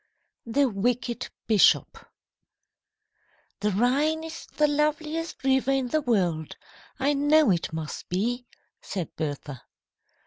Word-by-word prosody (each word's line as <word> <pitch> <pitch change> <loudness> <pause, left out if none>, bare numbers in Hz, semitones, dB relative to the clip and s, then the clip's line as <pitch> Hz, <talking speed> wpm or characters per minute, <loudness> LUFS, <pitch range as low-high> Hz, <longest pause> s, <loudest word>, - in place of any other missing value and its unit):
THE 275 +4 +3
WICKED 240 +3 -1 0.2
BISHOP 215 -4 +3 1.5
"THE 210 - +1
Rhine 275 +10 +1
is 325 0 -8
the 300 - +1
loveliest 305 +2 -1
river 265 0 +2
in 270 -2 +1
the 310 +4 +1
world. 180 - 0 0.4
I 280 +2 +2
know 290 -2 +4
it 170 -2 -1
must 160 -2 -6
be," 240 +7 -1 0.3
said 180 -5 -5
Bertha. 145 -3 -5
250 Hz, 110 wpm, -26 LUFS, 195-295 Hz, 1.5 s, know